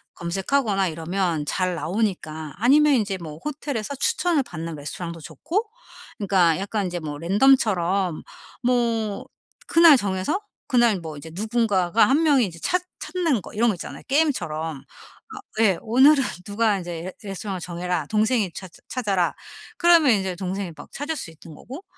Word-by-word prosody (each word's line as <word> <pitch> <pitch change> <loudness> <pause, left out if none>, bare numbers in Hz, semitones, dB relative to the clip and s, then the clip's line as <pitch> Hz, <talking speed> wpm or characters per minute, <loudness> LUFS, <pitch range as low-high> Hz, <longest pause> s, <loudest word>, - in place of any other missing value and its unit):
검색하거나 195 +3 0
이러면 165 -1 -2
잘 185 +3 -1
나오니까 160 -3 -2
아니면 285 +6 +5
인제 205 -6 0
뭐 155 -3 -8
호텔에서 285 -4 -4
추천을 300 +2 +1
받는 165 -5 -6
레스토랑도 165 +3 -6
좋고 365 - -3 0.5
그러니까 180 -5 +3
약간 200 +1 -2
인제 175 -1 -3
뭐 150 -2 -6
랜덤처럼 195 - +2 0.4
뭐 230 -4 0 0.4
그날 330 -4 +7
정해서 190 - -1 0.3
그날 240 -6 +3
뭐 160 -3 -8
이제 160 +3 -9
누군가가 215 -1 +2
1 290 +5 +3
명이 280 -6 +4
인제 170 -4 -8
찾 360 - 0 0.2
찾는 330 - -1
거 - - -12
이런 235 +3 +2
거 210 - 0
있잖아요 175 - -8
게임처럼. 165 - 0 0.5
아 - - -7 0.2
예. 195 -5 +4
오늘은 265 +5 +5 0.2
누가 210 +1 +1
인제 175 -3 -6
"레 185 +1 -6
레스토랑을 195 -1 -5
정해라. 175 -2 -3
동생이 215 -1 +1
찾 185 -2 -9 0.2
찾아라." 200 -8 0 0.4
그러면 335 -6 +5
이제 190 -3 -1
동생이 190 0 -4
막 - - -12
찾을 295 +4 -4
수 165 - -6
있는 160 -1 -14
거고 275 - -10
200 Hz, 335 characters per minute, -23 LUFS, 175-255 Hz, 0.5 s, 그날